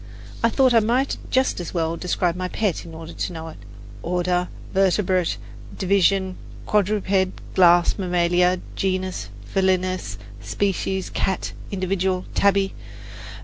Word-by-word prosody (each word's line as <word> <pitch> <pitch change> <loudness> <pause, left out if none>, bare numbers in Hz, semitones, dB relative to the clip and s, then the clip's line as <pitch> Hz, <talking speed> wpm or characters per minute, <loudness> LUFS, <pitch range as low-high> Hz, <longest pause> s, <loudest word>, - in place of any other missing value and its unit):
I 230 - +5
thought 260 +1 +3
I 230 - +7
might 245 +5 +1
just 260 -5 +1
as 175 +1 -6
well 165 -1 0
describe 175 0 0
my 185 0 -2
pet 200 -2 -1
in 165 -1 -10
order 165 +1 -8
to 180 - -3
know 160 0 -6
it 155 - -11 0.4
order, 180 +1 0 0.3
vertebrate; 190 -2 +2 0.4
division, 190 0 +2 0.3
quadruped; 200 -2 +1
class, 175 +1 +5
mammalia; 180 0 +2
genus, 185 - -2 0.2
felinus; 185 - 0 0.2
species, 190 - -1
cat; 190 - -1 0.2
individual, 185 -1 -1
Tabby. 200 -1 +2
185 Hz, 120 wpm, -23 LUFS, 175-195 Hz, 0.4 s, I